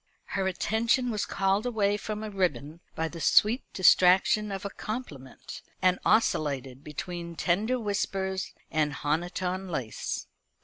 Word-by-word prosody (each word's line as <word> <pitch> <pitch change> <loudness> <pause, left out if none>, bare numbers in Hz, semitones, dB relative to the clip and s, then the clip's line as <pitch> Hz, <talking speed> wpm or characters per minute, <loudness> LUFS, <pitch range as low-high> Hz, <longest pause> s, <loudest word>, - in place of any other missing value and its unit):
Her 195 -1 0
attention 230 +6 +1
was 210 -2 -2
called 195 +2 +1
away 205 -4 +1
from 215 +1 -5
a 215 - -5
ribbon 165 -5 -1 0.2
by 160 - -1
the 165 0 -8
sweet 220 - +4
distraction 185 +3 +4
of 195 0 -5
a 200 - -3
compliment, 165 - -7 0.2
and 180 0 +3
oscillated 140 - +1
between 170 +3 -6
tender 215 +10 +1
whispers 195 -3 -2 0.2
and 150 -2 +1
honiton 180 +5 -2
lace. 130 -9 -4
190 Hz, 130 wpm, -28 LUFS, 160-210 Hz, 0.2 s, sweet